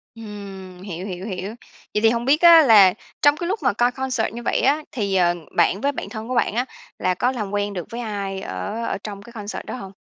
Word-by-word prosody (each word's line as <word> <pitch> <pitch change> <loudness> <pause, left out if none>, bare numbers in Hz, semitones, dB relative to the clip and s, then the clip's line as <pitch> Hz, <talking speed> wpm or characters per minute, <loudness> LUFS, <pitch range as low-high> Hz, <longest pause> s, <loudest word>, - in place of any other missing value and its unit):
Ừm, 195 -4 -9
hiểu, 185 -1 -6
hiểu, 185 0 -6
hiểu. 190 -2 -4 0.5
Vậy 210 - +2
thì 225 - +6
hông 235 0 -1
biết 285 +4 +3
á 335 -2 +9
là 205 -8 +7 0.3
trong 290 0 +5
cái 345 - -4
lúc 410 +4 -1
mà - - +3
coi 240 +4 +2
concert 260 -3 -2
như 240 - -6
vậy - - 0
á, 290 +3 +2
thì, 205 -8 -1
ờ, 175 -1 +3 0.2
bạn 175 +3 +3
với 280 +4 +1
bạn - - -6
thân 220 0 -7
của 255 - -2
bạn 235 -3 +1
á 245 +2 +1 0.3
là 185 - +1
có 245 +8 +1
làm 215 -6 -4
quen 205 0 -1
được 180 -3 -5
với 235 - -5
ai 200 -4 -4
ở 95 - -4
ở - - -2
trong 200 -2 -7
cái 235 - -14
concert 210 -2 -6
đó - - -5
hông? 195 -6 -8
210 Hz, 250 wpm, -22 LUFS, 195-245 Hz, 0.5 s, á